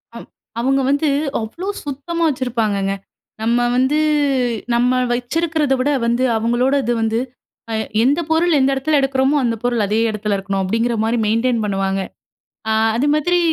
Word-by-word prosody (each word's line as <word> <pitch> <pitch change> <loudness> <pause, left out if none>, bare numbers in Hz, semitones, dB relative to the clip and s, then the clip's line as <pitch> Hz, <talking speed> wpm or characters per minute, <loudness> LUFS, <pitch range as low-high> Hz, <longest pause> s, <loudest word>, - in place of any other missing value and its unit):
அ - - -6 0.4
அவுங்க 270 +2 +1
வந்து 285 +2 +2 0.3
அவ்ளோ 330 - -6 0.2
சுத்தமா 295 +4 -3
வச்சுருப்பாங்கங்க. 220 -7 -1 0.5
நம்ம 235 +2 +1 0.2
வந்து 260 +4 +2 0.8
நம்ம 250 +1 +2
வைச்சுருக்குறத 300 +3 0
விட 260 +3 +1 0.2
வந்து 235 +2 +1
அவுங்களோட 240 +4 +1
இது 240 - 0
வந்து 225 +1 0 0.5
அ - - -2 0.3
எந்த 285 +7 +2
பொருள் 335 +1 +3
எந்த 265 +1 +3
எடத்துல 285 +2 +1
எடுக்குறோமோ 270 +1 +1
அந்த 230 -1 0
பொருள் 240 -3 +1
அதே 215 +3 0
எடத்துல 210 -1 -2
இருக்கணும், 195 0 -2
அப்டிங்கிற 230 +5 0
மாரி 225 +2 0
மெயின்டெயின் 230 +1 +1
பண்ணுவாங்க. 195 -1 -1 0.7
அ - - +2 0.2
அதுமாதிரி 300 +6 +2
245 Hz, 140 wpm, -19 LUFS, 225-285 Hz, 0.8 s, பொருள்